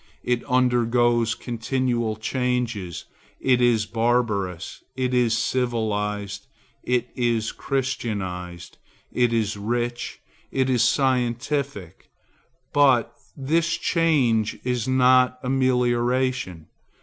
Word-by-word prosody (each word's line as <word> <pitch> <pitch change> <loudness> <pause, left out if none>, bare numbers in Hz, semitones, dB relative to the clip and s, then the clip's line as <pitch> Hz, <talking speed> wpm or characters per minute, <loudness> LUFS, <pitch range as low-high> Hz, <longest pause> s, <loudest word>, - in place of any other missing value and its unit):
It 125 -1 0
undergoes 120 -2 +2
continual 120 -1 -1
changes; 120 - -2 0.3
it 125 -2 +2
is 120 -3 +3
barbarous, 110 -6 -1
it 130 -1 -1
is 120 -3 +2
civilized, 105 -3 -2 0.3
it 125 -1 -1
is 115 -3 0
christianized, 95 -10 -4 0.3
it 120 -1 +2
is 110 -2 0
rich, 120 +3 -3 0.3
it 130 0 +1
is 125 -3 +2
scientific; 125 - -1 0.6
but 135 -5 +4 0.2
this 160 +4 +1
change 135 -10 +1
is 125 -2 -1
not 130 0 +4
amelioration. 125 -6 0
120 Hz, 90 wpm, -24 LUFS, 110-130 Hz, 0.6 s, but